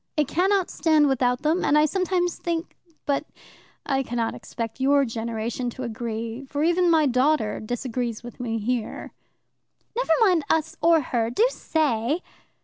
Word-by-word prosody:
"It 300 -3 +2
cannot 380 +3 +1
stand 310 -3 +3
without 250 -1 +1
them, 320 +4 +1
and 295 - +3
I 300 - +5
sometimes 360 +1 0
think 335 0 -3 0.3
But 280 0 0 0.6
I 270 0 +1
cannot 235 -3 -2
expect 230 +1 -6
your 275 +1 +4
generation 230 +1 -3
to 260 +2 -7
agree, 230 +1 -4
for 285 +2 -2
even 345 +2 +3
my 320 -2 +4
daughter 260 -3 +2
disagrees 240 0 -3
with 240 +1 -10
me 230 -2 -2
here." 230 +1 -3 0.8
"Never 485 -9 +2
mind 365 -7 +4
us 320 0 +1
or 330 -1 +5
her. 235 -4 -1
Do 335 - +3
say!" 295 - 0
270 Hz, 150 wpm, -24 LUFS, 235-320 Hz, 0.8 s, I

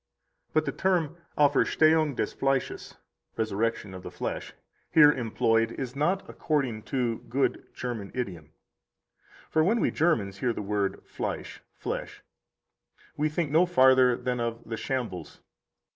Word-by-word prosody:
60 - - -43
But - - +3
the - - -1
term 175 -4 0 0.2
Auferstehung 150 +1 +4
des - - -2
Fleisches 135 -1 -1 0.4
(resurrection 110 -2 -1
of 95 - -8
the - - -7
flesh) - - -5 0.4
here 150 -2 +8
employed 115 -2 +1
is 130 -1 -5
not 175 +7 0
according 135 -8 -1
to 125 -4 0
good 135 +3 0
German 115 -6 -5
idiom. 90 -11 -4 1.0
For 160 - +3
when 220 +8 +2
we - - +2
Germans 105 - +1
hear 125 -2 +1
the 105 - -5
word 100 -1 -1
Fleisch - - -5
(flesh), - - -5 0.9
we 155 +1 +1
think 150 -1 -2
no 170 +4 +4
farther 130 -6 +5
than 125 -1 -2
of 115 0 -3
the 115 - -3
shambles. 120 -7 -4
130 Hz, 140 wpm, -28 LUFS, 115-150 Hz, 1.0 s, here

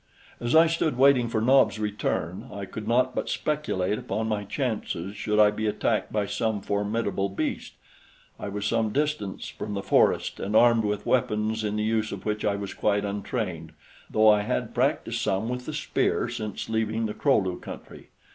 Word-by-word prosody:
As 120 +5 0
I 165 +1 +8
stood 165 -5 0
waiting 130 -2 +5
for 110 -1 0
Nobs' 130 0 +4
return, 105 -4 -2
I 100 -1 -5
could 105 +2 -7
not 125 +2 +2
but - - -3
speculate 105 -10 -1
upon 110 +3 -3
my 105 -2 -1
chances 105 - -3
should 105 +1 -1
I 105 -1 +6
be 110 +1 -2
attacked 105 - 0
by 105 -1 0
some 105 +1 -1
formidable 100 0 -1
beast. 95 - -3 0.7
I - - -4
was 100 +1 -4
some 115 -1 +1
distance 145 -6 -2
from 105 -1 -6
the 100 - -3
forest - - +2
and 105 +2 -2
armed 115 -1 +5
with 105 0 -2
weapons 110 -2 +1
in 105 0 -1
the 105 - 0
use 110 0 0
of 100 - -7
which 105 0 -1
I 100 - +1
was 100 -1 -5
quite 105 -1 +1
untrained, 100 -5 -4 0.4
though 110 0 +4
I 105 -1 +5
had 65 -11 -2
practiced - - 0
some 95 +4 0
with 125 0 -4
the - - -2
spear 150 - 0
since 110 -4 -5
leaving 110 0 -1
the 105 - -3
Kro 140 +3 +3
lu 95 -2 -1
country. - - -10
105 Hz, 185 wpm, -26 LUFS, 100-115 Hz, 0.7 s, I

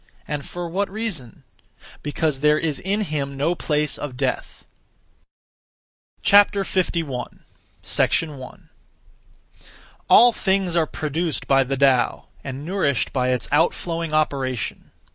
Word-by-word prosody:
And 150 -2 -3
for 175 -1 -5
what 195 +4 -1
reason? 190 - -5 0.6
Because 145 -1 -1
there 150 +1 +4
is 155 -2 -1
in 200 +3 -1
him 140 -7 -3
no 150 +5 +1
place 150 -3 -1
of 135 -4 -6
death. 130 -1 -3 1.6
51. 185 -9 +2 0.4
1. 145 -5 -1 1.4
All 245 +1 +8
things 190 -4 0
are 165 -2 +2
produced 155 +3 -3
by 135 0 +4
the 135 +1 -3
Tao, 130 -2 +2
and 135 +1 -6
nourished 165 - 0
by 125 -2 +1
its 125 -2 -1
outflowing 165 +1 0
operation. 135 -6 -1
150 Hz, 110 wpm, -22 LUFS, 135-175 Hz, 1.6 s, All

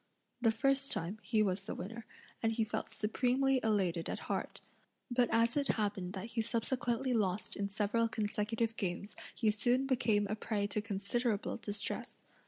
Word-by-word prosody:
The 225 -2 +5
first 275 +4 +3
time, 180 +6 -2
he 220 -3 +2
was 195 0 -1
the - - -3
winner, 225 +4 -6 0.3
and 225 - +2
he 225 0 +1
felt 215 - -3
supremely 255 +5 +2
elated 190 -7 +1
at - - -3
heart, - - -3 0.5
but 245 0 +3
as 230 +1 +3
it 285 -1 +1
happened 200 -4 -1
that 205 +4 -5
he 230 - +1
subsequently 240 +2 0
lost 205 -3 0
in 200 0 -2
several 215 +3 +1
consecutive 225 +1 -1
games 195 +1 -3 0.2
he 220 -3 +3
soon 245 +5 +2
became 235 -6 +2
a 215 - -1
prey 215 -1 -1
to 210 +1 -1
considerable 210 +2 -1
distress. 205 -2 -4
220 Hz, 165 wpm, -34 LUFS, 205-240 Hz, 0.5 s, The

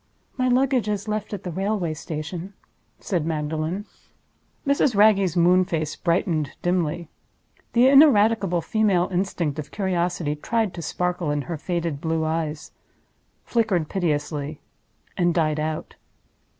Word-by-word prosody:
"My 255 -1 0
luggage 255 -3 +2
is 205 0 -2
left 215 0 -3
at 205 -3 -5
the 180 - -4
railway 190 -2 -1
station," 165 +5 -6 0.4
said 175 -5 -1
Magdalen. 160 +4 -2 0.8
Mrs. 280 -3 +2
Wragge's 200 -4 +4
moon 180 +2 +5
face 155 -4 -2
brightened 170 -4 0
dimly. 175 -2 0 0.7
The 245 +2 +5
ineradicable 225 - +5
female 200 -3 +1
instinct 175 -5 -1
of 150 - -6
Curiosity 175 -5 -1
tried 220 +5 -1
to 170 - -6
sparkle 180 +1 -2
in 145 -1 -1
her 170 - -4
faded 170 -3 -2
blue 160 -1 0
eyes—flickered 160 +4 -3
piteously—and 150 - -3
died 155 -3 +1
out. 155 0 -3
175 Hz, 120 wpm, -24 LUFS, 155-205 Hz, 0.8 s, moon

